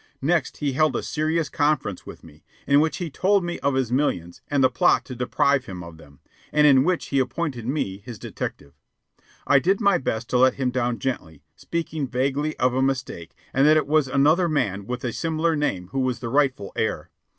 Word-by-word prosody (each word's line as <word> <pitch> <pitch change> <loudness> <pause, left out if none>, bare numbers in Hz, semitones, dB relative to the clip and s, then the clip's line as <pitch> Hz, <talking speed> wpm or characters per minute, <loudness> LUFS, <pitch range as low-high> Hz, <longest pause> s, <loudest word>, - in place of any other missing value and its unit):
Next 160 0 0
he 145 -2 -1
held 150 -1 +2
a - - -2
serious 155 +1 -1
conference 145 -10 -1
with - - -10
me, 75 -2 -17 0.2
in 140 +1 +4
which 160 +1 +1
he 175 -4 -4
told 195 +6 +2
me 175 0 -4
of 140 -1 0
his 130 -3 0
millions 90 - -1
and 140 -2 +1
the 130 - +5
plot 125 - +3
to 125 - -8
deprive 130 +2 +1
him 90 -2 -7
of 85 -1 -11
them, 70 -2 -18 0.3
and 150 0 +4
in 135 -3 +6
which 180 +2 -1
he 140 - +1
appointed 130 -3 -2
me 110 -9 -2
his 110 +2 -9
detective. 70 -6 -6 0.7
I 140 - +5
did 190 +7 +1
my 200 -4 +3
best 115 -3 -3
to 125 - +3
let 130 0 +4
him 130 -2 -1
down 120 -1 -1
gently, 80 - -5
speaking 160 -4 -4
vaguely 140 +5 -1
of 125 0 +2
a 130 - +1
mistake, 130 - -3 0.2
and 135 +3 +4
that 155 +1 +6
it 155 - +1
was 150 -1 +2
another 155 +7 +3
man 100 - -1
with 125 0 -4
a 120 -3 -2
similar 165 0 0
name 95 -12 -2
who 135 - -3
was 130 -2 0
the 120 - -6
rightful 130 -6 0
heir. - - -2
135 Hz, 210 wpm, -24 LUFS, 120-155 Hz, 0.7 s, in